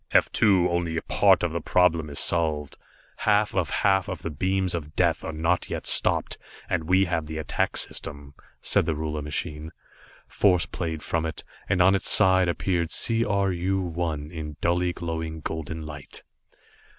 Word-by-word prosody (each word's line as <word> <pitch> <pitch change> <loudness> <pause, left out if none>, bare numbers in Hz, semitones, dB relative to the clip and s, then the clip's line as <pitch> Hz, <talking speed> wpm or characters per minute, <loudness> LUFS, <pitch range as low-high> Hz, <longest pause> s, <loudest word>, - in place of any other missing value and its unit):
"F - - +3
2, 95 -4 +4
only 85 -2 -1
a - - -2
part - - +4
of - - 0
the - - -3
problem 85 -4 +2
is 70 - -7
solved. 80 -4 +1 0.4
Half 105 0 +2
of 95 -4 0
half 95 -2 +2
of 90 -3 -6
the 85 - -3
beams 95 +4 0
of 75 -3 -5
Death 85 -4 +1
are - - -4
not 80 +3 0
yet - - -4
stopped. - - +2 0.3
And 85 -4 -1
we 95 +3 +4
have 85 -3 -2
the 80 0 -5
attack 80 - -1
system," 70 -2 -5 0.3
said - - +2
the 80 - 0
ruler 75 0 -3
machine. 75 +1 -4 0.6
Force 90 -4 +2
played 80 -3 -4
from 85 -1 -1
it, 80 - -7 0.3
and 95 -2 +4
on 95 +2 +5
its 95 - 0
sides 95 -3 +4
appeared 85 -1 -1
C 115 +6 0
R 100 -3 +1
U 95 +2 -1
1 80 -4 -3
in 75 -3 -6
dully 90 +1 +1
glowing 80 -2 -4
golden 80 +1 -5
light. 75 -2 -6
85 Hz, 175 wpm, -25 LUFS, 80-95 Hz, 0.6 s, on